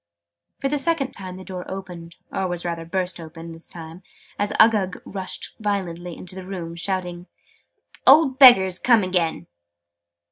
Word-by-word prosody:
For 275 - -1
the 290 +1 0
second 280 -3 0
time 185 -2 -8
the 190 - -9
door 185 -1 -6
opened 180 -3 -8 0.2
or 190 - -1
rather 175 -1 -3
was 165 - -15
burst 185 0 -2
open, 165 0 -9
this 165 0 -9
time, 165 +1 -10 0.4
as 205 +1 0
Uggug 210 -4 +4
rushed 190 -1 -5
violently 180 -5 -3
into 185 - -6
the 190 0 -8
room, 170 -4 -6
shouting 180 0 -3
"that - - -29
old 275 -5 +5
Beggars 190 -9 +8
come 235 -4 +4
again!" 180 -3 -1
185 Hz, 155 wpm, -23 LUFS, 170-200 Hz, 0.4 s, Beggars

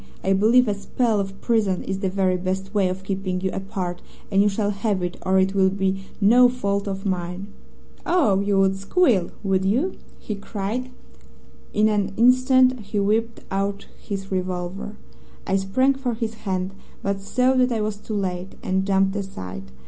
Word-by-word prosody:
'I 195 - +3
believe 225 +5 +4
a 205 - +2
spell 215 +2 0
of 195 0 -4
prison 210 -6 +1
is 190 0 -3
the 195 -2 0
very 185 -1 +1
best 190 +2 -3
way 195 -3 +2
of 185 +1 -5
keeping 190 -1 -2
you 190 0 -1
apart, 190 -2 -4 0.3
and 195 0 +4
you 205 - +4
shall 205 +1 0
have 200 -2 -1
it, 175 0 -2
or 190 0 +2
it 190 +1 +3
will 190 -1 +4
be 195 0 -1
no 240 +4 +6
fault 200 -5 -2
of 195 0 -4
mine.' 180 0 -2 0.6
"'Oh, 295 - +3
you 200 0 +1
would 195 0 +3
squeal, 200 - +2
would 190 -1 +1
you?' 250 - +1 0.2
he 215 - -5
cried, 205 +4 -4
and 255 - -16 0.8
in 215 +1 +3
an 205 -2 0
instant 255 +1 +5
he 205 0 -3
whipped 225 +3 0
out 200 +1 -2 0.2
his 195 -1 -5
revolver. 185 +2 -3 0.5
I 195 - +1
sprang 255 +8 +2
for 260 -3 -3
his 225 -1 -3
hand, 185 -1 -1 0.3
but 200 0 -1
saw 250 +6 +2
that 250 0 +3
I 225 -2 0
was 210 -1 -2
too 215 +1 -6
late, 185 -2 -3
and 190 +1 0
jumped 195 0 +2
aside. 90 - -6
195 Hz, 180 wpm, -23 LUFS, 190-220 Hz, 0.8 s, no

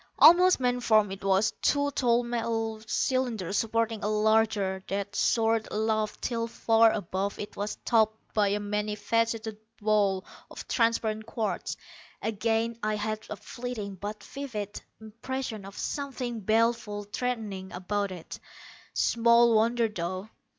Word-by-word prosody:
Almost 350 +4 +7
man 250 -1 +1
form 215 -4 +3
it 195 0 -7
was 195 +2 +3
two 285 0 +2
tall 245 -3 +2
metal 225 -2 -2
cylinders 225 -7 0
supporting 225 -1 0
a - - +1
larger, 215 -3 +2
that 200 +1 -3
soared 225 0 +2
aloft 215 0 -1
till 230 -1 -1
far 225 -1 +4
above 195 0 -2
it 205 - -7
was 205 +1 -3
topped 220 -2 +3 0.2
by 210 -2 +3
a 205 +1 0
many 210 +1 -2
faceted 225 0 -1 0.2
ball 205 -3 +2 0.2
of - - -9
transparent 225 -2 +1
quartz. 215 -5 -3 0.4
Again 225 +1 -1
I 215 0 0
had 215 +1 -3
a - - -4
fleeting, 225 -3 -6
but 205 +2 -6
vivid, 220 -8 -6 0.2
impression 225 0 -5
of 195 0 -10
something 255 -5 -3
baleful, 220 0 +1
threatening, 205 -4 -4
about 200 +2 -2
it. 175 -3 -8 0.6
Small 235 0 +4
wonder, 230 +1 +3
though. 185 0 -4
220 Hz, 135 wpm, -28 LUFS, 205-230 Hz, 0.6 s, Almost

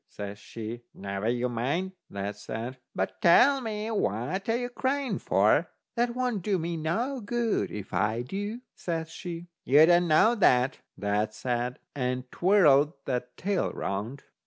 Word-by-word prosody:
says 100 0 -7
she. 115 +2 -7
"Never 100 +2 -3
you 120 +1 0
mind," 135 +11 -1 0.2
that 100 +1 -4
said, 115 +5 -6 0.2
"but 95 - -2
tell 265 +11 +6
me 220 -1 -3
what 185 - -1
you're 235 +2 +1
a - - -5
crying 265 +2 -1
for." - - +3 0.3
"That 240 0 +1
won't 250 -5 -1
do 195 +2 +1
me 170 0 -2
no 225 - -1
good 235 +1 0
if 105 -2 -7
I 105 +6 +1
do," 205 - -4
says 165 -2 -4
she. 170 -1 -6 0.2
"You 145 +4 +7
don't 175 +1 +4
know 165 +9 +5
that," 130 - +3 0.2
that 105 +1 -1
said, 125 0 -2 0.2
and 125 -2 -1
twirled 155 -6 +5
that's 125 -2 -2
tail 195 -1 0
round. 105 +8 -4
155 Hz, 155 wpm, -28 LUFS, -, 0.3 s, You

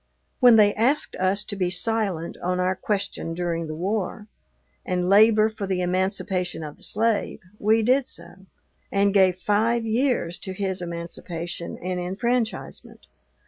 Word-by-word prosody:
When 245 -2 +7
they 205 -2 +5
asked 260 +7 +1
us 190 +3 +1
to 205 - -6
be 185 -2 0
silent 190 -3 -1
on 180 +1 -1
our 185 +1 +1
question 195 -4 -3
during 170 -2 -2
the 155 - -5
War, 200 +4 -2 0.6
and 180 -1 -1
labor 215 +2 +6
for 215 -2 -5
the 185 -1 -1
emancipation 185 -1 -1
of 150 -1 -8
the - - -19
slave, 225 0 0 0.2
we 220 +2 +3
did 255 +3 +3
so, 190 +1 -11 0.4
and 200 0 +2
gave 190 -3 +4
five 225 +4 +1
years 225 -6 0
to 190 - -5
his 190 -1 -2
emancipation 170 0 -6
and 180 0 -3
enfranchisement. 220 +6 -3
195 Hz, 145 wpm, -24 LUFS, 180-220 Hz, 0.6 s, When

